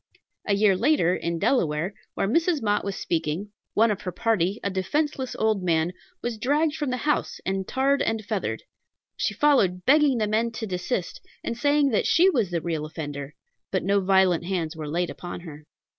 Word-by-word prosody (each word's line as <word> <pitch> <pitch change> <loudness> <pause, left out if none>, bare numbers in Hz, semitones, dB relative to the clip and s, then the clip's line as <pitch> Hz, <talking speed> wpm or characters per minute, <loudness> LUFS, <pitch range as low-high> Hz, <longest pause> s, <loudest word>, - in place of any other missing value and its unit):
A 200 - +3
year 200 -1 +4
later, 190 - +3
in 170 0 -2
Delaware, 175 - +1 0.2
where - - 0
Mrs. 330 - +2
Mott 205 -1 +1
was 200 -1 -3
speaking, 165 +4 -2 0.2
one 225 +1 +4
of 205 - -3
her 180 - -4
party, 210 -2 0
a 200 - -1
defenceless 260 +8 -1
old 220 -3 +1
man, 170 -1 +1 0.3
was 235 -2 -3
dragged 295 +6 +2
from 295 -3 -2
the 255 - -1
house, 300 - 0
and 190 0 -2
tarred 275 +2 +1
and 220 -2 -1
feathered. 195 - -2 0.5
She 210 - -1
followed, 195 -10 +3
begging 290 -2 +5
the 215 - +1
men 220 +2 +1
to 225 - -4
desist, 180 0 -3 0.2
and 235 - -3
saying 285 +3 +3
that 220 - +1
she 370 +3 +5
was 230 - +1
the 170 -2 -2
real 160 -3 -2
offender, 145 -2 -6 0.3
but - - -1
no 200 +1 +3
violent 190 -3 +3
hands 175 -3 -2
were 155 -2 -6
laid 175 +3 -1
upon 175 -1 -7
her. 150 -3 -11
200 Hz, 190 wpm, -25 LUFS, 175-245 Hz, 0.5 s, begging